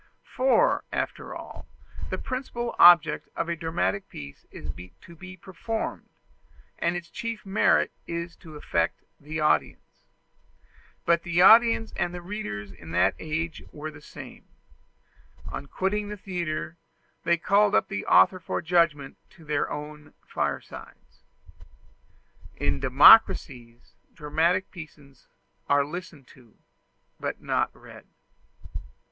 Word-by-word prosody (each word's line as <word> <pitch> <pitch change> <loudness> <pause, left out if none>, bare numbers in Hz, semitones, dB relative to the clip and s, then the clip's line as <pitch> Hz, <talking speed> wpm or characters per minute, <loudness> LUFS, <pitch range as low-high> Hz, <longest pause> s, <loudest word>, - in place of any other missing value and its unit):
For, 270 - +3
after - - -4
all, - - -10 0.4
the - - -3
principal 255 -2 -4
object 170 -3 +6
of - - -2
a 170 - -1
dramatic 170 +4 -2
piece 70 -1 -11
is 75 - -7 0.3
to 170 - -14
be 190 +2 -11
performed, 205 +5 -5 0.7
and 170 +1 0
its 175 -1 -6
chief 230 +4 -6
merit 195 +2 +2 0.2
is 170 0 -5
to 160 -4 -13
affect 85 - -2 0.2
the 155 +2 -6
audience. 150 - -1 1.0
But 170 -1 +3
the 175 +1 +2
audience 230 +2 +6
and 175 0 -2
the 175 - -7
readers 175 - -6
in 85 -3 -13
that - - +3
age 160 +1 -4
were 155 +1 -7
the 145 -1 -14
same: - - -12 1.0
on 140 - -6
quitting 205 +6 -2
the 210 - -6
theatre 170 -4 -4 0.5
they 170 0 +2
called 200 +4 +3
up - - +2
the 100 - -5
author 185 - +5
for 165 - -3
judgment 165 -5 +1 0.2
to 165 - -16
their 150 -1 -1
own 150 0 -8
firesides. - - -6 1.3
In 70 -1 -1
democracies, 130 - +5 0.2
dramatic 170 +5 0
pieces 145 -6 -13 0.4
are 145 0 +3
listened 165 -3 -8
to, 120 -4 -20 0.6
but - - -4
not - - 0
read. - - -14
170 Hz, 125 wpm, -26 LUFS, 150-190 Hz, 1.3 s, object